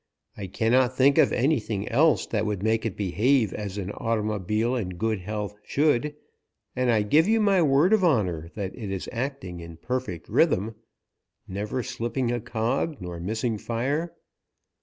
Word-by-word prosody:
I 100 -2 -6
cannot 125 +5 +2
think 140 +2 +5
of - - +5
anything 115 -7 0
else 150 +6 +3
that 110 -1 -1
would 100 -2 -2
make 110 +1 +1
it 105 - -6
behave 105 +4 +2
as 100 -1 -5
an 100 -1 -4
automobile 110 +1 -1
in 95 -8 -3
good 110 +1 0
health 105 +2 -4
should, 150 0 +1 0.6
and 125 0 +1
I 110 -3 +3
give 155 - +4
you 225 +1 +3
my 200 -4 +3
word 150 +6 +4
of 215 -3 +3
honour 90 - +1
that 100 -3 -4
it 110 -5 -6
is 95 -1 -4
acting 120 -8 -4
in 85 -1 -10
perfect 125 -4 -4
rhythm, 105 +5 +2 0.7
never 105 +6 -3
slipping 120 0 -2
a 120 - -1
cog 120 +7 -1
nor 90 -2 -6
missing 110 +4 -2
fire. 140 +10 -2
115 Hz, 160 wpm, -26 LUFS, 100-130 Hz, 0.7 s, think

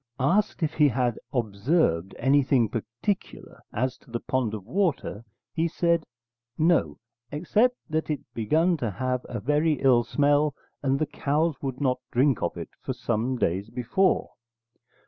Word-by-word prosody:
Asked 185 +7 +1
if 155 - 0
he 150 -2 +5
had 125 -2 0
observed 105 - +1
anything 130 -3 +3
particular 120 - -4
as 130 +3 -2
to - - -23
the 120 0 -3
pond 120 -5 -1
of 100 -3 -8
water, 155 - -1 0.3
he 165 0 +1
said, 170 -1 +1 0.5
'No, 155 - +2 0.3
except 215 +11 +2
that 160 +1 -2
it 150 - -1
begun 160 - +2
to 120 -6 -2
have 125 +5 -2
a 120 - -3
very 150 +6 +2
ill 130 -4 +4
smell 145 +3 +2 0.3
and 135 -1 +1
the 155 - +1
cows 150 +1 -1
would 135 -2 -4
not 130 -3 +1
drink 130 -1 +2
of - - -2
it - - -6
for - - -3
some 120 +3 -1
days 95 0 -1
before.' 125 +11 +1
135 Hz, 150 wpm, -26 LUFS, 120-155 Hz, 0.5 s, he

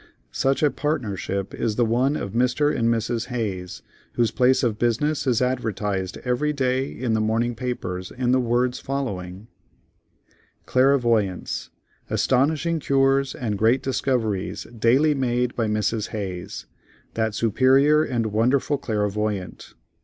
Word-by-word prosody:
Such 135 - 0
a 150 - +4
partnership 100 - -3
is 110 -3 -1
the 120 - +2
one 125 +6 +1
of 100 - -4
Mr. 125 +5 +1
and 115 -1 +1
Mrs. 115 0 -1
Hayes, 100 -8 -4 0.3
whose 115 -2 +1
place 130 +1 +3
of 110 -3 0
business 140 +6 0
is 125 -1 +2
advertised 105 -6 -2
every 125 +5 +1
day 130 -1 0
in 120 -2 -2
the 110 - +1
morning 115 +2 0
papers 95 -7 -4
in 125 -1 -1
the 130 - +4
words 125 +1 0
following: 100 -8 -4 1.2
"CLAIRVOYANCE.—Astonishing 130 - 0
cures 135 -1 +2
and 105 -5 -3
great 115 +4 +3
discoveries 120 -7 -1
daily 130 +7 +3
made 125 -2 0
by 115 -2 0
MRS. 105 0 -1
HAYES, 95 -5 -6 0.5
that 110 -2 -1
superior 135 +7 +4
and 120 -5 -1
wonderful 130 +6 +1
clairvoyant. 105 -4 -3
120 Hz, 125 wpm, -23 LUFS, 110-130 Hz, 1.2 s, a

